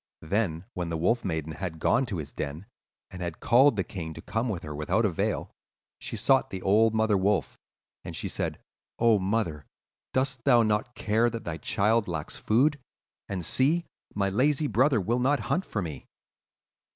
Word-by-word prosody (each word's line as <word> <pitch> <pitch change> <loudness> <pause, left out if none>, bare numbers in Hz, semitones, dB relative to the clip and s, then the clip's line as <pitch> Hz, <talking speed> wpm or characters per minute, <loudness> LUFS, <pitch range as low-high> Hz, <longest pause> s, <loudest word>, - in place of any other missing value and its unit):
Then, 85 -1 -1
when 90 -2 -3
the 85 - -2
Wolf 105 +9 +1
Maiden 80 -4 -2
had 85 0 -5
gone 125 +10 +2
to 100 -6 -3
his 75 -4 -6
den, 75 +7 -5 0.5
and 90 - -8
had 85 -2 -4
called 130 +2 +5
the 95 - 0
king 80 -3 -6
to - - -8
come 110 +3 -1
to 100 -7 -2
her 75 - -5
without 75 +10 0
avail, 90 -6 -1 0.5
she - - -5
sought 135 -1 +3
the 95 -3 -6
old 110 +3 +4
mother 110 -1 +3
wolf, 95 -9 +1 0.5
and - - -7
she - - -3
said, - - -2 0.4
'Oh, 115 -3 +4
mother, 95 - -1 0.4
dost 130 -2 -1
thou 120 -4 +5
not 110 +2 0
care 115 +3 +2
that 115 -1 -6
thy 80 -1 -4
child 105 +7 +1
lacks 80 -4 -4
food? 140 +7 +2 0.5
and 90 -4 -3
see, 155 - +2 0.3
my 100 -1 +1
lazy 145 +8 +2
brother 130 -2 +3
will 115 +6 0
not 140 +3 +2
hunt 190 - +1
for 105 - -2
me. 75 -6 -7
105 Hz, 180 wpm, -27 LUFS, 85-120 Hz, 0.5 s, called